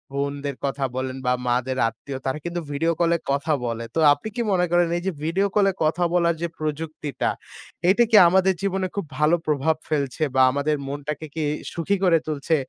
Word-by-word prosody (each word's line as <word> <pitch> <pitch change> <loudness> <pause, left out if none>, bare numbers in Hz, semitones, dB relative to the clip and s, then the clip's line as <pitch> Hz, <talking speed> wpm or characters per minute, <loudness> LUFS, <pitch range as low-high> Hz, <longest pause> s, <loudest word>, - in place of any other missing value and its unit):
বোনদের 140 0 -2
কথা 135 0 -1
বলেন 130 0 -3
বা 125 - +3
মাদের 125 +2 0
আত্মীয় 130 +4 -7
তারা 135 +3 -1
কিন্তু 175 0 -3
video 165 +4 +1
call 170 -1 +3
এ - - -17
কথা 145 +3 0
বলে। 115 0 -3
তো - - +1
আপনি 145 +10 -6
কি 240 - -1
মনে 180 -1 +3
করেন 175 -1 +4
এই 175 - -5
যে - - +2
video 190 +5 +1
call 205 -1 +4
এ - - -11
কথা 165 +3 +1
বলার 170 -1 +3
যে 170 - 0
প্রযুক্তিটা, 155 -1 -3 0.6
এটা 220 +5 +5
কি 215 - +8
আমাদের 190 +1 +3
জীবনে 190 -1 -1
খুব 200 - -2
ভালো 155 +3 +4
প্রভাব 150 +1 +2
ফেলছে 145 -1 -1
বা 130 - +5
আমাদের 140 +2 0
মনটাকে 145 +2 -5
কি 160 - -1 0.3
সুখী 170 +4 0
করে 175 -3 +5
তুলছে? 155 +1 0
155 Hz, 200 wpm, -23 LUFS, 140-175 Hz, 0.6 s, কি